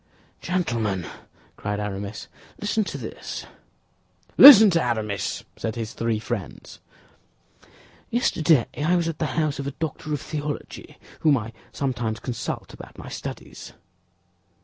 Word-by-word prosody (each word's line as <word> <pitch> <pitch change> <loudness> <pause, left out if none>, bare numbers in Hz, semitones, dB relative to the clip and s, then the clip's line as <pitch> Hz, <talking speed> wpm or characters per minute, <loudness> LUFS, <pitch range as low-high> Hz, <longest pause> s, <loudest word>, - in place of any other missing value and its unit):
"Gentlemen," 115 - -1 0.5
cried 105 0 -3
Aramis, 100 0 -5 0.3
"listen 210 +1 0
to - - -5
this." - - -7 0.9
"Listen 220 -7 +11
to 165 -1 +2
Aramis," 110 -5 -2
said 110 - -3
his 115 -1 -5
three 115 -1 -1
friends. 110 -4 -6 1.3
"Yesterday 165 - +3 0.2
I 175 +4 +3
was 170 -2 +1
at 165 -2 -4
the 155 - 0
house 155 -3 0
of 140 - -3
a - - -2
doctor 155 -1 -4
of 150 - 0
theology, 150 -1 -6 0.2
whom 150 -3 +4
I 115 0 -6 0.2
sometimes 120 -5 -2
consult 125 -3 -5
about - - -12
my - - -9
studies." - - -8
135 Hz, 125 wpm, -24 LUFS, 110-160 Hz, 1.3 s, Listen